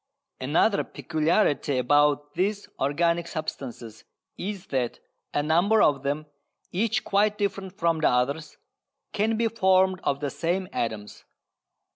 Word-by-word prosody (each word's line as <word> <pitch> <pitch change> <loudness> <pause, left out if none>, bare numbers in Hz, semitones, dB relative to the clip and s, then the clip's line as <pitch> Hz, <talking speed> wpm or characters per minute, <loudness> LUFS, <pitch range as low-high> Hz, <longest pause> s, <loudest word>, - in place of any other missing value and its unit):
Another 160 +10 +2
peculiarity 155 -3 0
about 145 +3 +2
these 200 +4 -1
organic 170 +5 +1
substances 125 -8 -6 0.3
is 195 0 -5
that 130 -3 -1 0.3
a 145 - 0
number 175 +8 +3
of 140 -2 +3
them, 145 +2 -2 0.5
each 210 +4 0
quite 210 +1 +2
different 195 -2 -3
from 165 -1 +1
the 155 - +3
others, 140 +6 -1 0.6
can 220 +2 +1
be 230 0 +2
formed 190 -3 +3
of 140 - 0
the 145 -1 -3
same 180 +5 -1
atoms. 110 -3 -4
165 Hz, 125 wpm, -26 LUFS, 140-195 Hz, 0.6 s, number